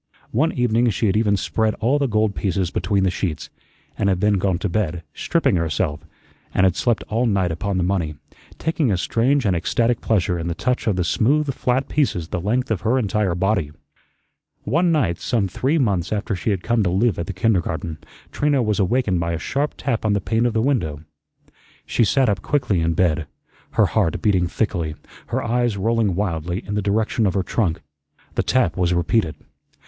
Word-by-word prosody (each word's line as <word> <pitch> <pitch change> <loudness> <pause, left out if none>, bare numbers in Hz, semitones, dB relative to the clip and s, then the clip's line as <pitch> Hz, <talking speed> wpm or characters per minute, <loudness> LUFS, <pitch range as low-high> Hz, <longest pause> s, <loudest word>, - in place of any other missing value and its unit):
One 155 +8 +2
evening 120 -1 +2
she 110 +2 -1
had 100 -1 +2
even 105 -2 +2
spread 110 +3 0
all 125 +7 +1
the 140 - +1
gold 110 -2 +1
pieces 95 -3 -1
between 100 -2 0
the 95 - +2
sheets, 85 -5 -4 0.5
and 100 - +2
had 95 -2 +1
then 105 0 +2
gone 95 -2 +1
to 100 - -2
bed, 85 -3 -2
stripping 165 - +1
herself, 80 -2 -1 0.6
and 95 - +3
had 95 -2 +3
slept 120 -3 0
all 115 +3 0
night 95 -5 +1
upon 95 +4 -2
the 90 - +1
money, 85 -5 -1 0.4
taking 160 -6 0
a 95 - +1
strange 125 +8 +1
and 95 -3 +2
ecstatic 115 +7 0
pleasure 90 -5 +1
in 85 - -3
the 85 - -2
touch 125 +6 -1
of 105 - +2
the 90 - 0
smooth 135 - +1
flat 125 +1 0
pieces 90 - 0
the 85 - -3
length 120 +6 0
of 100 -5 0
her 115 +6 +2
entire 105 -6 0
body. 95 -4 0 0.9
One 165 +10 +2
night, 130 - +1
some 110 -5 0
three 135 - 0
months 100 - 0
after 105 -1 -1
she 90 - -2
had 95 -4 -1
come 115 -1 +1
to 95 - +1
live 100 +1 +1
at 85 - -3
the - - -3
kindergarten, 85 -5 -1 0.3
Trina 145 -3 +1
was 105 -1 0
awakened 100 -2 +1
by 85 0 -1
a - - -1
sharp 140 - -2
tap 120 -4 -2
on 110 -1 +2
the 100 - +1
pane 115 +5 +1
of 120 - -2
the 110 -1 +1
window. 80 - -1 0.8
She 115 - +2
sat 135 +5 +3
up 100 -2 0
quickly 120 -10 0
in 80 0 0
bed, 85 -2 +1 0.5
her - - +4
heart 80 - 0
beating 95 -4 +2
thickly, 85 -5 -2 0.3
her - - -2
eyes 120 -2 0
rolling 110 -2 +1
wildly 90 -2 -2
in 105 - -4
the 105 - 0
direction 105 +2 +1
of 95 - -1
her 95 - +1
trunk. 90 -3 -1 0.5
The - - +1
tap 130 -9 +1
was 90 -1 +1
repeated. 85 0 +1
100 Hz, 200 wpm, -21 LUFS, 90-115 Hz, 0.9 s, her